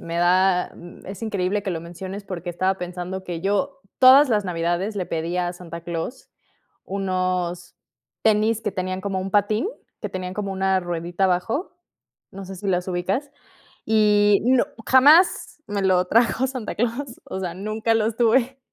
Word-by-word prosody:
me 165 0 -5
da 180 +1 +3
mm, 175 0 -13
es 195 +2 -8
increíble 205 -2 -1
que 195 - -3
lo 165 -2 -3
menciones, 185 +4 -8
porque 180 -2 -5
estaba 185 +2 0
pensando 180 +1 -5
que 175 -3 -5
yo, 205 +10 -1 0.2
todas 265 +3 +8
las 210 -4 +1
navidades 175 +3 -1
le 185 -3 -2
pedí 165 +2 -3
a 175 -1 -1
Santa 170 -2 -9
Claus, 170 +10 -5 0.5
unos 185 -2 -2 0.5
tenis 220 +1 +2
que 210 -2 -2
tenían 185 0 -3
como 195 -1 -2
un 190 +1 -5
patín, 210 - +2 0.3
que 210 - -5
tenían 185 -1 -5
como 200 -2 -3
una 190 0 +1
ruedita 175 +1 -3
abajo. 190 - 0 0.5
No 195 0 -9
sé 190 +1 -8
si 200 +2 -6
los 180 -1 0
ubicas. 190 +11 -2 0.5
Y 210 -2 +4
no 255 0 +4 0.2
jamás 300 +5 +5
me 205 -1 -2
lo 185 -1 +3
trajo 235 +5 +2
Santa 255 -4 -5
Claus, 240 +3 -3
o 190 - -5
sea, 180 -3 -3
nunca 215 +4 -1
los 225 0 0
tuve. 245 +3 +2
190 Hz, 165 wpm, -23 LUFS, 180-220 Hz, 0.5 s, todas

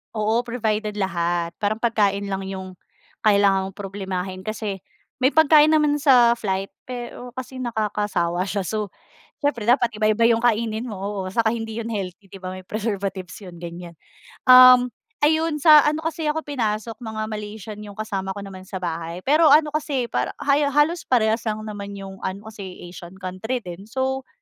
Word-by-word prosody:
Oo, 220 +2 +1
provided 215 -3 -1
lahat. 175 -3 -1
Parang 205 +1 0
pagkain 205 -4 +1
lang 195 0 -3
'yong, 190 -1 -7 0.4
kailangan 200 -2 +3
mong 195 - -11
problemahin 190 -2 -5
kasi, 210 -2 -3 0.4
may 260 - +4
pagkain 310 -1 +6
naman 300 -1 +3
sa 250 -5 +6
flight 195 -1 -2 0.2
pero 245 0 -7
kasi 255 0 -7
nakakasawa 210 -7 -1
siya, 200 -1 -2
so 210 +3 -2 0.6
siyempre 240 -7 0
dapat 240 -1 +4
iba-iba 215 +1 +2
'yong 230 0 +4
kainin 230 0 +1
mo, 215 - -6
oo, 195 -1 -4
saka 225 +2 +2
hindi 225 -1 -4
'yon 230 0 -4
healthy, 195 -1 -6
'di 195 - -10
ba, 185 0 -6
may 185 - -9
preservatives 195 -3 -4
'yon, 175 -3 -10
ganiyan. 170 0 -8 0.5
Um, 255 -1 +8 0.3
ayun, 315 +1 +2
sa 305 -1 +9
ano 310 +1 -2
kasi 320 -1 -2
ako 315 +1 -1
pinasok, 225 -5 -2
mga 220 -2 -5
Malaysian 210 0 -7
'yong 205 -1 -10
kasama 195 -3 -4
ko - - -5
naman 190 -1 -10
sa - - -6
bahay, 170 +1 -4
pero 305 +3 +5
ano 300 +1 +5
kasi, 280 -5 -1
parang - - -1
haya 285 +1 +3
halos 295 +5 +1
parehas 225 -2 +3
lang 215 0 -3
naman 200 -2 -7
'yong 195 -1 -9
ano, 200 +3 -5
kasi 200 -3 -8 0.2
Asian 175 +1 -11
country 195 +6 -4
din. 180 +4 -9
So, 265 +1 -2
215 Hz, 170 wpm, -23 LUFS, 195-250 Hz, 0.6 s, sa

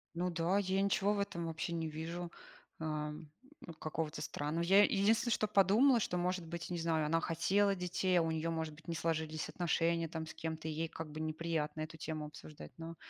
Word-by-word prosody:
Ну 180 +1 0
да, 170 +3 +1
я 190 -1 +1
ничего 200 +1 +2
в 205 - -1
этом 170 -4 -2
вообще 165 +1 -3
не 165 -1 -1
вижу, 170 +3 -5 0.5
а, 155 -1 -2
м, 150 0 -9 0.5
какого-то 155 0 -3
странного. 155 +4 -2
Я, 195 +4 +7
единственное, 215 +4 +3
что 215 - +2
подумала, 215 +6 +5
что, 180 - 0
может 180 0 0
быть, 170 0 -5
не 175 -1 -2
знаю, 160 -2 +1
она 165 +2 +2
хотела 195 +6 +2
детей, 180 0 +1
а - - +4
у 165 0 0
неё, 160 +1 -1
может 160 -1 -2
быть, 165 +3 -17
не 165 - -2
сложились 160 -1 -1
отношения 170 -1 +1
там 160 -1 -4
с - - -7
кем-то, 160 -1 -4
и - - -1
ей 160 +2 -1
как 160 -1 -6
бы 155 - -6
неприятно 155 -1 -2
эту 155 +1 -5
тему 155 -1 -4
обсуждать. 150 0 -10
Но 165 0 -7
165 Hz, 205 wpm, -35 LUFS, 160-180 Hz, 0.5 s, Я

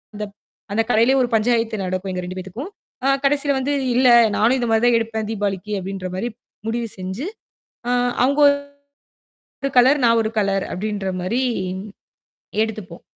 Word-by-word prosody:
அந்த 210 - -3 0.5
அந்தக் 225 +2 0
கடையிலயே 235 +5 +4
ஒரு 245 - +1
பஞ்சாயத்து 225 -2 +1
நடக்கும். 185 +1 -3
எங்க 180 - -3
2 185 +1 -6
பேத்துக்கும். 220 - -7 0.4
அ - - +3 0.2
கடைசில 285 0 +2
வந்து, 285 +2 -1 0.2
"இல்ல, 255 0 +4 0.3
நானும் 235 +5 +4
இந்தமாரி 225 -1 +1
தான் 240 -1 +5
எடுப்பேன் 220 -1 -3
தீபாவளிக்கு" 205 -1 -2
அப்பிடின்ற 190 0 -5
மாரி 235 +6 -2 0.4
முடிவு 230 0 -1
செஞ்சு, 190 - -5 0.6
அ - - +1 0.3
அவுங்க 280 +3 +2 1.0
ஒரு 275 -1 -6
கலர், 270 +4 +5
நான் 230 0 +4
ஒரு 220 - -2
கலர் 195 -1 +1
அப்பிடின்றமாரி 195 +2 -2 1.2
எடுத்துப்போம். 205 -6 -8
220 Hz, 140 wpm, -21 LUFS, 195-245 Hz, 1.2 s, தான்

